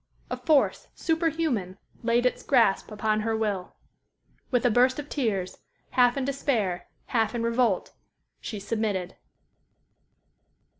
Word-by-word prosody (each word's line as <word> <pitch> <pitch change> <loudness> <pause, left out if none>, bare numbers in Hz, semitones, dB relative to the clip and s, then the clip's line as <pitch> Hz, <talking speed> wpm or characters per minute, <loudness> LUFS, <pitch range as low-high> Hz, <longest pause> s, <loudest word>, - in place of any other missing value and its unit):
A - - 0
force, 300 -4 +2
superhuman, 320 - 0 0.2
laid 235 +1 +2
its 250 - +1
grasp 235 -8 +3
upon 215 0 0
her 220 +1 0
will. 205 -4 -2 0.7
With 250 -1 +1
a 245 - +5
burst 250 +3 +4
of 295 0 -6
tears, 200 -10 -2 0.3
half 245 0 +4
in 270 - 0
despair, 235 -10 -1 0.2
half 225 -1 0
in 235 - -1
revolt, 230 -4 +1 0.5
she 210 - -5
submitted. 200 -3 -2
230 Hz, 120 wpm, -27 LUFS, 210-255 Hz, 0.7 s, a